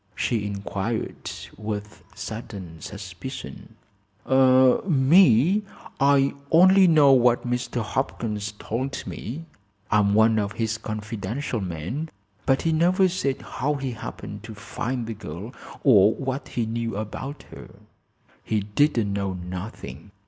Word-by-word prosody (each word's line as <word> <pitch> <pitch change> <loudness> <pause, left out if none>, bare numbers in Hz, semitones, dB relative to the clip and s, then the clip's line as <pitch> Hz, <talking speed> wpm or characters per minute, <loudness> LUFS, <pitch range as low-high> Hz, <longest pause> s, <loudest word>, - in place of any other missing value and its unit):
she 110 -4 -1
inquired, 100 +2 -4 0.3
with 105 0 -5
sudden 100 -5 -7
suspicion. 100 +5 -8 0.5
"Me? 135 - +5 0.4
I 140 0 +4 0.2
only 185 +3 +7
know 150 -4 +6
what 125 -2 +4
Mr. 125 -1 -2
Hopkins 110 -3 -3
told 130 +6 -4
me. 145 +9 -6 0.5
I'm 105 -1 +3
one 110 0 +5
of 100 0 -2
his 115 0 -2
confidential 110 +3 -4
men. 95 - -4 0.4
But 135 0 +3
he 165 - +2
never 180 +4 +4
said 155 -7 -2
how 145 +4 -2
he 135 -2 -3
happened 110 -4 -7
to 110 -2 -9
find 115 +3 -4
the 115 - -4
girl, 100 - -8 0.3
or 105 -5 +6
what 135 +1 -4
he 120 - -2
knew 115 -1 -3
about 130 +7 -5
her." - - -11 0.7
"He 110 -1 0
didn't 105 0 +1
know 100 -1 -1
nothing. 90 - -7
115 Hz, 120 wpm, -25 LUFS, 105-135 Hz, 0.7 s, only